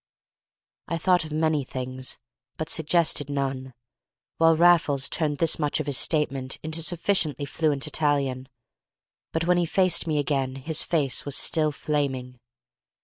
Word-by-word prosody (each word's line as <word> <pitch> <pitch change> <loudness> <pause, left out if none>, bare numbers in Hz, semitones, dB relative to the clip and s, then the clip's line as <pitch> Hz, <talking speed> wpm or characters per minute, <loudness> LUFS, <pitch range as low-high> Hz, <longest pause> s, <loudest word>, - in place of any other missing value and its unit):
I 165 - -2
thought 180 0 +2
of 155 - -9
many 155 -1 +1
things 130 0 -6 0.4
but 155 0 -4
suggested 160 -3 +1
none, 135 -2 -3 0.6
while 165 0 +4
Raffles 160 -5 +4
turned 150 -3 -1
this 165 +2 +1
much 150 -1 0
of 155 - -2
his 140 -3 +1
statement 140 -4 0
into 160 +1 -2
sufficiently 160 -4 0
fluent 145 -1 0
Italian. 140 -4 0 0.8
But 160 +1 -1
when 180 0 +3
he 175 - +1
faced 185 -1 +1
me 155 -2 0
again 135 -2 -1
his 150 +4 -1
face 145 -6 0
was 145 -1 -2
still 155 -2 +2
flaming. 135 -4 -3
150 Hz, 145 wpm, -25 LUFS, 135-160 Hz, 0.8 s, while